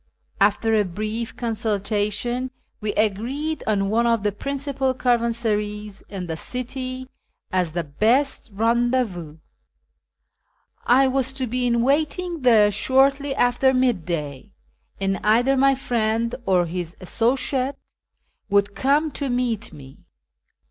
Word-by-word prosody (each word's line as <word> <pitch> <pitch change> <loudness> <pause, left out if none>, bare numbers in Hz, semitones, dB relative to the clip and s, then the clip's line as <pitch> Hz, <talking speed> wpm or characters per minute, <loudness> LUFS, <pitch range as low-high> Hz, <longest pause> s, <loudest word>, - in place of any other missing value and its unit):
After 210 +2 +3
a 215 -1 +4
brief 215 +5 -4
consultation 220 +2 -1 0.3
we 210 -1 -2
agreed 245 +10 -1
on 200 -2 +1
one 235 +2 +2
of 230 -3 +2
the 205 - +1
principal 275 +3 -2
caravansarays 215 -4 -1
in 195 -3 -5
the 165 -2 -4
city 255 +5 -5 0.4
as 180 -4 0
the 175 0 -1
best 230 - +1
rendez 240 +4 +2
vous. 165 -5 -9 1.5
I 265 +2 +5
was 265 0 0
to 265 -1 -2
be 250 +1 -1
in 235 - +2
M 235 - +2
aiting 315 +4 0
there 220 -5 +5
shortly 270 +5 +2
after 255 +1 +3
midday, 170 - -1 0.5
and 195 0 0
either 240 +6 +3
my 270 +1 +4
friend 230 -2 -1
or 180 -2 +3
his 170 0 -5
associate 255 +7 0 0.7
would 200 0 +2
come 285 +8 +1
to 280 -1 -3
meet 245 -3 -1
me. 135 -2 -13
230 Hz, 125 wpm, -23 LUFS, 205-260 Hz, 1.5 s, I